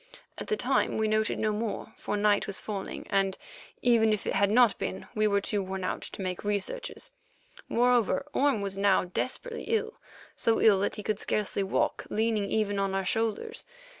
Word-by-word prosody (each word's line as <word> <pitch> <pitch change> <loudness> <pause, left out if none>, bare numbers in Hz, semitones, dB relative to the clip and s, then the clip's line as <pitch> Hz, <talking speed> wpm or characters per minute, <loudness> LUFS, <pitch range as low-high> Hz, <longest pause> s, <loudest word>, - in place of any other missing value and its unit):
At - - -5
the 430 - 0
time - - +1
we 220 0 +1
noted 215 0 +1
no 215 -1 0
more, 215 0 -4
for 205 - -3
night 205 0 +3
was 200 +1 -1
falling, 205 -3 -5
and, 195 -1 +1 0.5
even 230 -3 +4
if 210 - -3
it - - -1
had 200 0 +3
not 235 0 +4
been, 190 - -4
we 215 0 +2
were 200 -1 +2
too 205 0 -1
worn 190 0 -4
out 185 - -2
to 195 - -7
make 185 -1 -3
researches. 210 - -3 0.6
Moreover, 245 +1 +2
Orme 275 -6 +2
was 195 -1 -2
now 200 -1 +4
desperately 260 - -4
ill—so 450 - -2
ill 205 -3 +5
that 200 - -1
he 210 - -6
could 210 -1 -1
scarcely 210 -1 -1
walk 195 - 0
leaning 220 -1 +1
even 205 -2 0
on 195 -1 0
our 195 0 -1
shoulders. 225 - -1
210 Hz, 185 wpm, -29 LUFS, 200-230 Hz, 0.6 s, ill